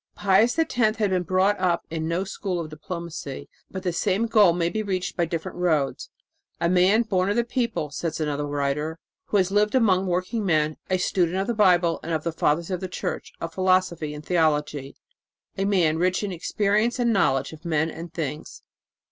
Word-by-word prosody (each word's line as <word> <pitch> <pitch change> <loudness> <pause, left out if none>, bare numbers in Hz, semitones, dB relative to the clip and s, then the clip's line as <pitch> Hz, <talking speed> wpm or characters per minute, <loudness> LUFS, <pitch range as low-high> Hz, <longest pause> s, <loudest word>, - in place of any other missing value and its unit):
Pius 205 +6 +3
X 325 - +1
had 220 -2 +2
been 195 -4 +1
brought 185 +3 +1
up 180 -2 +1
in 160 -1 -2
no 170 +3 0
school 195 -2 -4
of 155 -2 -5
diplomacy, 160 -3 -6 0.2
but 190 -1 -6
the 180 -2 -1
same 200 +4 +1
goal 215 -5 +5
may 170 0 0
be 215 +5 -2
reached 190 -3 -3
by 170 - +1
different 165 +1 -5
roads. 155 -6 0 0.5
"A 170 - +1
man 185 +6 +4
born 190 -4 0
of 205 - +1
the 235 - +2
people," 235 - -2
said 160 +2 -3
another 145 -1 -2
writer, 145 +2 -2 0.3
"who 210 - 0
has 190 -1 +2
lived 210 +3 +2
among 195 -6 +3
working 185 +5 -1
men, 155 -4 +1
a 185 - +2
student 180 -1 0
of 195 - 0
the 240 - -1
Bible 180 -5 +3
and 165 - -4
of 155 -1 -1
the 170 - -1
Fathers 165 +3 0
of 180 - -1
the 185 - -4
Church, 185 - -4
of 165 0 -5
philosophy 185 -5 +1
and 150 0 -10
theology 150 -5 0 0.6
a 195 - -1
man 170 -6 +2
rich 185 +3 +1
in 205 - -2
experience 210 +6 0
and 240 -2 +2
knowledge 135 -8 +1
of 155 - -13
men 160 -1 0
and 165 +1 -8
things." 155 -2 -5
180 Hz, 200 wpm, -24 LUFS, 160-200 Hz, 0.6 s, goal